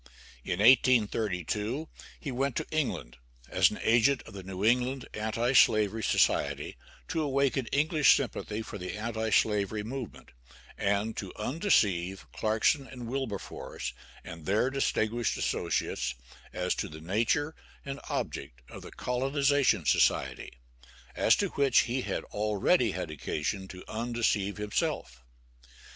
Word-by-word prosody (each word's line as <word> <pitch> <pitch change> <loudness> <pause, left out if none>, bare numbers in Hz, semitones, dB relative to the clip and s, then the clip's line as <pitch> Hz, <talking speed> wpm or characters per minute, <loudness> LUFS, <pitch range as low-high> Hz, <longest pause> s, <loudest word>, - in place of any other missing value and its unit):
In 90 - -2
1832, 110 - +3 0.3
he 145 - -5
went 135 +1 -1
to - - -1
England, 125 - -2 0.3
as - - +4
an - - -6
agent 120 +3 +3
of - - -13
the 100 - -7
New 95 +2 -4
England 125 +3 +1
Anti 110 +4 -1
slavery 110 -3 +4
Society, - - +1 0.3
to 160 - 0
awaken 140 -3 +1
English 150 +1 +4
sympathy 110 -4 -4
for 105 - -8
the 90 +3 -5
anti 110 0 -2
slavery 105 0 +1
movement, 125 +1 -7 0.5
and 100 +3 0
to 95 -3 -5
undeceive 105 - +1
Clarkson 110 +6 +1
and 125 -2 -8
Wilberforce 130 -6 -4 0.3
and 85 -2 -9
their 110 +6 +2
distinguished 120 -4 0
associates 60 0 -1 0.4
as - - -1
to - - -3
the 75 0 -9
nature 115 - 0 0.3
and 140 0 -5
object 65 -2 -4
of - - -9
the - - -10
Colonization 135 - +1
Society, 70 - +2 0.6
as - - +4
to - - 0
which 140 -1 +4
he 125 +2 -2
had - - -3
already 105 - +2
had 90 -4 -4
occasion 80 +6 -3
to 90 -1 -10
undeceive 110 -3 -1
himself. 100 -11 -2
110 Hz, 130 wpm, -29 LUFS, 100-135 Hz, 0.6 s, as